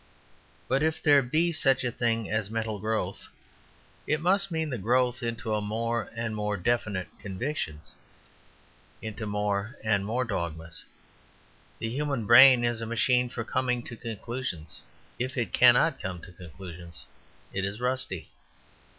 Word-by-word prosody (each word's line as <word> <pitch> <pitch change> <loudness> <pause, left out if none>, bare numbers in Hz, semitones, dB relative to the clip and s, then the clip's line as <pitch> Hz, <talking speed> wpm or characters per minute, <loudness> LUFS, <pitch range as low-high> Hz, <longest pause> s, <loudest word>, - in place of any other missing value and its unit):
But 135 +2 +1
if 160 +1 +1
there 145 -2 +7
be 155 +7 +1
such 135 -5 +3
a 120 - 0
thing 115 -2 0
as 110 -1 -1
mental 110 -1 -2
growth, 110 -3 -2 0.8
it 150 - +1
must 195 +4 +2
mean 160 -3 -2
the 125 - -3
growth 125 +4 +2
into 115 -2 -2
more 115 +2 -2
and 115 -1 -3
more 105 -1 -1
definite 100 -2 -1
convictions, 95 - -4 1.1
into 110 0 -5
more 105 +3 -1
and 105 -3 +2
more 120 +5 -1
dogmas. 85 -6 -4 0.9
The 115 - -3
human 140 -2 -2
brain 125 +2 +9
is 120 -1 0
a 115 - -4
machine 125 +2 +2
for 120 -1 -4
coming 125 0 -1
to 120 - -7
conclusions; 115 -7 -5 0.4
if 130 +2 -3
it 120 - -1
cannot 125 +5 +5
come 90 -2 -4
to - - -11
conclusions 85 -1 -10 0.5
it 95 - -1
is 100 +3 -3
rusty. 130 +1 0
115 Hz, 140 wpm, -28 LUFS, 105-130 Hz, 1.1 s, brain